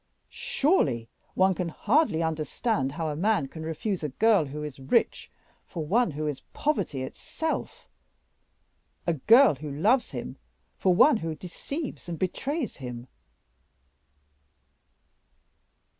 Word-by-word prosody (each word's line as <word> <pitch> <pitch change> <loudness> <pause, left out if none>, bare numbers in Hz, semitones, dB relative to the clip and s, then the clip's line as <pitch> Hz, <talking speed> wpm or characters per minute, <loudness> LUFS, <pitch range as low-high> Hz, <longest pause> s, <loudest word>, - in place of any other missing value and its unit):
Surely, 140 - +1 0.3
one 190 0 +4
can 180 -1 -3
hardly 215 - +2
understand 155 - -1
how 160 0 -2
a 150 - -3
man 175 -4 +1
can 160 +4 -9
refuse 165 +4 -3
a 150 - -1
girl 205 - +3
who 150 +2 -6
is 145 -3 -7
rich 130 - +1 0.3
for 160 -3 -6
one 230 +7 +3
who 155 0 -4
is 150 -3 -3
poverty 190 - -1
itself 320 - -4 1.2
a 170 - +2
girl 230 - +6
who 150 +2 -7
loves 210 - +2
him - - -6 0.4
for 185 -2 +2
one 275 +6 +6
who 165 -4 -4
deceives 260 - -6
and 170 - -4
betrays 265 - -2
him." 125 -3 -7
165 Hz, 125 wpm, -27 LUFS, 150-225 Hz, 1.2 s, girl